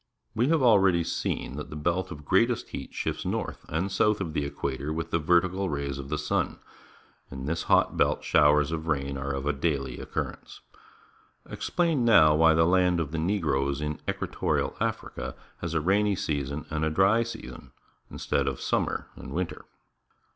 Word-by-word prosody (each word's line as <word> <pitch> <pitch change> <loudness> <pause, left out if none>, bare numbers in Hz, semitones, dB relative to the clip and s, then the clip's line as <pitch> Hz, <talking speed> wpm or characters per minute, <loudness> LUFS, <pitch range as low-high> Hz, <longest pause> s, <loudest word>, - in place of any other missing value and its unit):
We 120 +2 +1
have 160 -2 +2
already 95 -7 +5
seen 70 -3 -3
that 75 - -6
the - - -8
belt 85 +4 -1
of 75 -4 -9
greatest 115 +8 +2
heat - - -7
shifts - - -3
north - - -3
and 90 +6 -1
south 105 +2 +2
of 85 -5 -4
the 75 - -1
equator 70 0 -3
with 80 +1 -4
the 80 - +2
vertical 90 +4 +2
rays 70 -2 -3
of 70 0 -7
the - - -1
sun. - - -1 0.7
In 65 -1 -7
this 85 +3 -1
hot - - +3
belt - - +2
showers 75 0 +4
of 80 0 -4
rain 70 -3 -1
are 70 +1 -4
of 70 +1 -2
daily 70 -6 -1
occurrence. - - -5 0.9
Explain 165 -7 0
now 85 -10 +6
why 80 +1 +5
the 80 0 +4
land 90 0 +3
of 75 -3 -2
the 80 - -2
Negroes 75 -7 0
in 75 0 -3
Equatorial - - -1
Africa - - -3 0.2
has 85 -1 -4
a 80 - +2
rainy 100 +4 +2
season 70 -3 -3
and 80 0 -1
a 80 - +2
dry 95 +8 +4
season 90 - -7 0.4
in.stead 70 -1 -1
of 65 -2 -2
summer - - -1
and - - -9
winter. 90 0 -4
80 Hz, 175 wpm, -27 LUFS, 70-95 Hz, 0.9 s, now